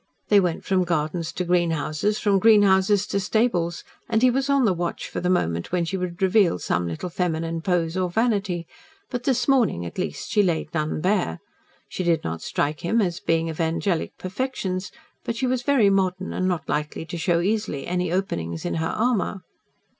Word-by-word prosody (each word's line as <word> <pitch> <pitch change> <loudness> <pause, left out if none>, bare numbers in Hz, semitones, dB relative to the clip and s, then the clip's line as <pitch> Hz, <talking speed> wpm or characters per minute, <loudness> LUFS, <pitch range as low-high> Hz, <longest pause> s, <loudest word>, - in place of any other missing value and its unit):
They 205 - +6
went 175 -4 -1
from 190 -1 +2
gardens 165 -1 -1
to 180 - -2
greenhouses, 170 +2 +1
from 200 -3 +2
greenhouses 205 -2 +5
to 200 -1 -1
stables, 185 -5 0 0.3
and 225 +1 +2
he 255 - +6
was 270 +2 -1
on 275 -2 +4
the 200 - +3
watch 175 -1 -3
for - - -4
the 180 - -1
moment 85 - 0
when 175 -1 +1
she 190 - -3
would 180 0 -3
reveal 190 - +4
some 85 0 -1
little 85 - -4
feminine 165 -2 -2
pose 170 -1 0
or 185 -1 0
vanity, 195 -4 0 0.5
but, 245 -1 -4
this 255 -3 +1
morning, 240 - +2
at 85 - -7
least, 75 - -4
she 210 - +4
laid 170 -5 -1
none 155 -1 -1
bare. 185 - 0 0.5
She 185 - -4
did 170 -2 +1
not 80 0 -4
strike 150 +1 -1
him 220 +7 +1
as 180 -4 0
a 205 - -32
being 165 0 +2
of 160 0 -3
angelic 165 +2 -1
perfections, 185 -3 -3 0.3
but 230 - -3
she 255 - -1
was 255 -1 0
very 245 -6 +3
modern 190 -1 0
and 185 - 0
not 180 -3 -2
likely 150 +2 -2
to 170 - -6
show 170 +1 +2
easily 200 -6 -1
any 180 -1 -1
openings 85 - -2
in - - -1
her - - 0
armour. 215 -4 0
180 Hz, 195 wpm, -24 LUFS, 165-205 Hz, 0.5 s, They